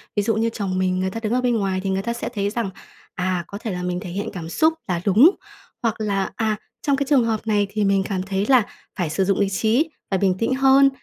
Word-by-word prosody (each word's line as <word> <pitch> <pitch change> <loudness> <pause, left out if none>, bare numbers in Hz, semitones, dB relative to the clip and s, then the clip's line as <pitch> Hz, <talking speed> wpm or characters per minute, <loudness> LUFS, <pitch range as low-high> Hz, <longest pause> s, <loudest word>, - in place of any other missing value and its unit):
Ví 205 - +2
dụ 225 0 +1
như 225 +1 +1
chồng 195 -4 -3
mình, 185 0 +1
người 190 0 0
ta 225 - -4
đứng 215 +2 0
ở 250 - +2
bên 245 -2 +1
ngoài 190 -2 0
thì 195 - -1
người 190 0 0
ta 235 +3 -2
sẽ 235 - -4
thấy 205 -4 -1
rằng, 225 -2 -2 0.5
à, 180 -1 -1
có 200 - -7
thể 220 -2 -5
là 180 0 -4
mình 180 0 -2
thể 180 -2 -7
hiện 200 +4 -3
cảm 165 -3 -6
xúc 315 - +3
là 175 -2 -1
đúng, 220 - +7 0.5
hoặc 230 -1 +1
là, 200 -2 -1
à, 220 -2 0 0.3
trong 280 -1 +2
cái 280 0 -1
trường 270 -5 +5
hợp 225 -1 -2
này 205 -2 +2
thì 210 0 -1
mình 195 -1 +2
cảm 190 -2 -1
thấy 195 +1 -1
là 255 -4 +6 0.3
phải 175 -4 -1
sử 175 +5 0
dụng 195 0 +1
lý 200 -1 +2
trí, 225 - +1 0.2
phải 190 -2 +1
bình 190 -2 +2
tĩnh 255 +3 +1
hơn, 270 +1 +6
205 Hz, 270 wpm, -22 LUFS, 190-230 Hz, 0.5 s, đúng